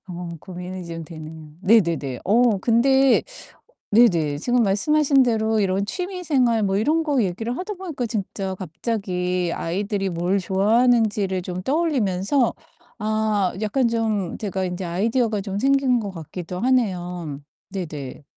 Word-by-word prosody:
어 175 -1 -6
고민이 180 0 -7
좀 165 -1 -6
되네요. 155 -1 -10
네네네. 170 - +2
어 230 0 +3
근데 260 +5 +4 0.7
네네. 170 -10 +4
지금 245 +7 +2
말씀하신 275 +8 +3
대로 220 -3 +2
이런 195 0 +1
취미 360 - -4
생활 250 -8 +2
뭐 195 -1 +1
이런 305 +10 +2
거 290 -5 +1
얘기를 225 +5 -2
하다 375 +3 -4
보니까 330 -10 -4
진짜 195 -3 -3
갑자기 180 -1 -2
아이들이 195 +3 -2
뭘 175 +3 0
좋아하는지를 205 -1 +2
좀 180 0 -5
떠올리면서 260 - +1 0.4
아 215 -3 0
약간 235 +4 +1
좀 220 -6 -1
제가 195 -3 -2
인제 180 +1 -4
아이디어가 215 +5 0
좀 195 0 -4
생긴 270 -1 +3
것 205 -3 -4
같기도 175 +1 -7
하네요. 180 - -1 0.3
네네. 150 -8 -6
205 Hz, 290 characters per minute, -23 LUFS, 180-240 Hz, 0.7 s, 근데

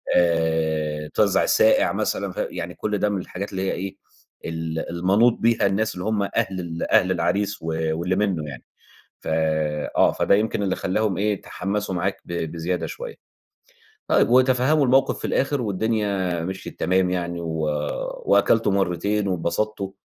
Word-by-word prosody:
آآ، 80 -3 +1
توزّع 100 -3 +3
الساقع - - +4
مثلًا - - -1
ف - - -15
يعني - - -5
كل 105 -1 -2
ده 105 - +1
من 100 -3 -1
الحاجات 100 +4 -6
اللي 95 -1 -3
هي - - +1
إيه، 95 +1 -5 0.5
ال 80 0 -4
المَنوْط 95 +8 +3
بيها 115 -2 +2
الناس 100 +2 +1
اللي 90 +2 -5
هُم 110 -2 +1
أهل 95 -1 -1
ال 85 -2 -4
أهل 95 0 +4
العريس 100 +3 0
و - - -9 0.3
واللي 90 +2 0
منه 95 -7 -1
يعني، 65 -3 -9 0.6
ف - - -19 0.7
آه، - - +5
فده - - +2
يمكن 105 +1 0
اللي 95 -2 0
خلّاهم 95 0 0
إيه، 105 +1 +1
يتحمّسوا 100 0 -3
معاك 95 +3 -2
ب - - -9 0.2
بزيادة 85 +2 -2
شوية 485 -1 -7 0.9
طيب - - +4
وتفهّموا 130 +4 +4
الموقف 135 +1 +3
في - - -10
الآخر 140 0 0
والدنيا 100 -4 -1
مِشْيت 95 +1 -7
تمام، 95 0 +2
يعني 85 -1 -2
و 80 -1 -4 0.7
وأكلتوا 100 +1 +3
مرّتين 100 +2 0
واتبسطْتوا 95 +3 -2
95 Hz, 155 wpm, -23 LUFS, 85-105 Hz, 0.9 s, آه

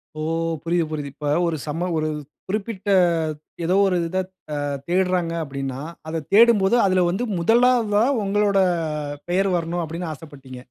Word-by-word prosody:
ஓ! - - -7 0.4
புரியுது, 170 -1 0
புரியுது. 145 -3 -4
இப்போ 145 -1 -3 0.2
ஒரு 160 -2 -1
சம 165 +5 -2
ஒரு 155 0 0 0.4
குறிப்பிட்ட, 205 0 -3 0.7
ஏதோ 180 +3 +1
ஒரு 185 - +1
இத 185 - -1 0.7
தேடுறாங்க 180 -2 +1
அப்டின்னா, 135 -2 -5 0.3
அதத் 160 -2 -4
தேடும்போது, 225 -1 +6
அதில 185 -2 +3
வந்து 195 +7 -1 0.2
முதலாவதா, 225 +1 +3 0.2
உங்களோட 200 0 +2 0.7
பெயர் 195 +2 +2
வரணும் 170 +1 -2
அப்படின்னு 165 +1 -5
ஆசப்பட்டீங்க. 135 -4 -11
175 Hz, 130 wpm, -22 LUFS, 155-200 Hz, 0.7 s, தேடும்போது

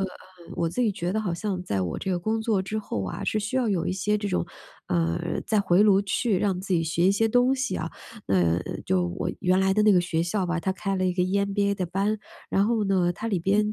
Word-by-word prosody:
呃， 195 - +1 0.5
我 170 - 0
自 175 - -3
己 220 - +2
觉 175 -2 -3
得 220 - 0
好 185 -5 -2
像 185 +1 -3
在 100 - -2
我 90 -3 -2
这 190 - -3
个 180 - 0
工 220 +5 -1
作 220 -3 +1
之 195 +3 -4
后 110 - -3
啊， - - -5
是 215 - 0
需 225 +5 -2
要 250 -3 +1
有 190 -5 0
一 - - 0
些 205 +3 0
这 205 -1 -3
种 85 - 0 0.4
呃， 85 -1 0
再 215 -2 +2
回 190 -1 +3
炉 200 -2 +5
去 200 0 0
让 190 -3 0
自 190 0 -1
己 165 - +2
学 165 +2 +1
一 195 - +5
些 225 +3 +2
东 245 +3 +3
西 270 +1 -2
啊， - - -3 0.4
那 - - +1
嗯， 85 +1 -1
就 90 -2 +1
我 85 - -3
原 185 +1 +2
来 190 0 +3
的 210 - +2
那 210 - +6
个 180 - +5
学 170 -1 -1
校 190 +3 -1
吧， 175 0 -1
它 190 +3 -1
开 195 +1 -2
了 185 0 +1
一 180 - +1
个 180 - +1
EMBA 200 +2 +1
的 185 -2 -2
班， 200 +4 -1 0.3
然 195 +1 +3
后 230 -1 +1
呢， 185 -3 +2
它 220 +6 -5
里 200 -5 0
边 205 +4 +1
190 Hz, 295 characters per minute, -26 LUFS, 175-210 Hz, 0.5 s, 那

